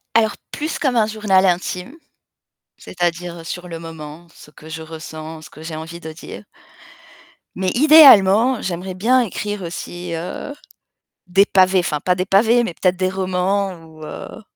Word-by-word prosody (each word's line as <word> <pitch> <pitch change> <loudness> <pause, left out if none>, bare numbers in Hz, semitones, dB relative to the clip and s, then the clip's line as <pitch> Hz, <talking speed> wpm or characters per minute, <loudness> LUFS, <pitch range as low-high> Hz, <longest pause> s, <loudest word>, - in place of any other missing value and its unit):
Alors 220 -2 +3 0.2
plus 310 +2 -4
comme 265 -4 0
un 225 -2 +4
journal 210 -3 +2
intime, 180 - -2 0.8
c'est-à-dire 175 -1 -4
sur 180 +1 -6
le 165 - -6
moment, 165 0 -10
ce - - -16
que 155 +1 -15
je 160 0 -7
ressens, 160 0 -9
ce - - -13
que 155 - -13
j'ai 160 -1 -6
envie 165 +2 -8
de 160 -1 -8
dire. 155 - -10 1.1
Mais 185 0 -1
idéalement, 250 -6 +7
j'aimerais 185 +1 -4
bien 240 +8 +3
écrire 210 -2 -4
aussi, 175 0 -6
heu, 175 +11 -5 0.7
des 195 +3 +4
pavés, 185 -1 +3
enfin 150 -4 -1
pas 180 +5 +1
des 180 0 -2
pavés, 225 +5 +3
mais 205 - -4
peut-être 185 +2 +1
des 185 0 0
romans 190 +1 -1
ou 160 -1 -14
heu, 155 - -9
180 Hz, 160 wpm, -19 LUFS, 165-205 Hz, 1.1 s, idéalement